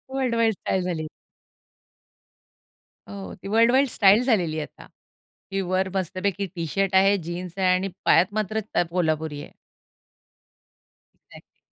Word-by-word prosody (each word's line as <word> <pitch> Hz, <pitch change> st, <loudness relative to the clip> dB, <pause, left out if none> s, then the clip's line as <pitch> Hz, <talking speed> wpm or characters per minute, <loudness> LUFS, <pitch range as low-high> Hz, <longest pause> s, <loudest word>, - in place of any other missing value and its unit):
World 255 Hz, -3 st, 0 dB
wide 230 Hz, -1 st, +2 dB
style 190 Hz, -1 st, -2 dB
झाली. 165 Hz, -3 st, -3 dB, 2.0 s
हो. 95 Hz, -3 st, -8 dB
ती -, -, -11 dB
वर्ल्ड 230 Hz, +3 st, +4 dB
वाईड 270 Hz, +2 st, +4 dB
स्टाईल 205 Hz, +1 st, +4 dB
झालेली 180 Hz, -11 st, +1 dB
आहे 150 Hz, -, -3 dB
आता. -, -, -16 dB, 0.6 s
की 195 Hz, -, -1 dB
वर 185 Hz, +1 st, 0 dB
मस्तपैकी 195 Hz, +2 st, -2 dB
टी 170 Hz, -1 st, -3 dB
शर्ट 195 Hz, +3 st, -1 dB
आहे, 195 Hz, +1 st, +5 dB
जीन्स 175 Hz, +1 st, -7 dB
आहे 190 Hz, -1 st, +1 dB
आणि 185 Hz, +1 st, 0 dB, 0.2 s
पायात 180 Hz, +4 st, +4 dB
मात्र 215 Hz, 0 st, -1 dB, 0.2 s
त 175 Hz, -, +3 dB
कोल्हापुरी 160 Hz, -4 st, -1 dB
आहे. -, -, -11 dB, 1.6 s
एक्झॅक्टली! -, -, -19 dB
190 Hz, 140 wpm, -24 LUFS, 170-205 Hz, 2.0 s, आहे